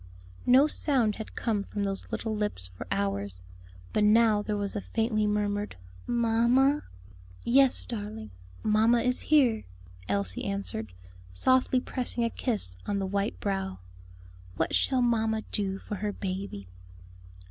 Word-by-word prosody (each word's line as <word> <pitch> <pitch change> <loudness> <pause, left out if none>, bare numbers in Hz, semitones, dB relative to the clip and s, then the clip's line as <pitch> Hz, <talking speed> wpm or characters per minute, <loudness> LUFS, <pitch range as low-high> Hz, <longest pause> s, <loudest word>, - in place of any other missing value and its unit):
No 260 +3 +7
sound 260 -8 +1
had 220 - -8
come 215 -3 0
from 205 +1 -4
those 195 -1 -3
little 220 -1 -2
lips 210 - 0
for 90 -2 -9
hours; 100 -1 -2 0.5
but 210 - +2
now 215 0 +5
there 210 0 -2
was 200 -1 -2
a 205 - -2
faintly 220 -1 0
murmured 205 0 -1 0.3
"Mamma!" 240 +5 +3 0.6
"Yes, 265 +1 +4
darling, 205 - -6 0.3
mamma 225 +2 +3
is 250 +1 +1
here," 255 -8 +3 0.5
Elsie 100 -2 0
answered, 155 - -4 0.4
softly 255 - +3
pressing 250 -2 0
a 230 - 0
kiss 210 - 0
on 205 - 0
the 195 - -1
white 200 - -2
brow; 95 0 -2 0.8
"what - - 0
shall 260 -2 +2
mamma 220 -2 +1
do 195 -2 -1
for 205 +1 -6
her 205 +2 -2
baby?" 190 - -5
210 Hz, 135 wpm, -28 LUFS, 195-235 Hz, 0.8 s, No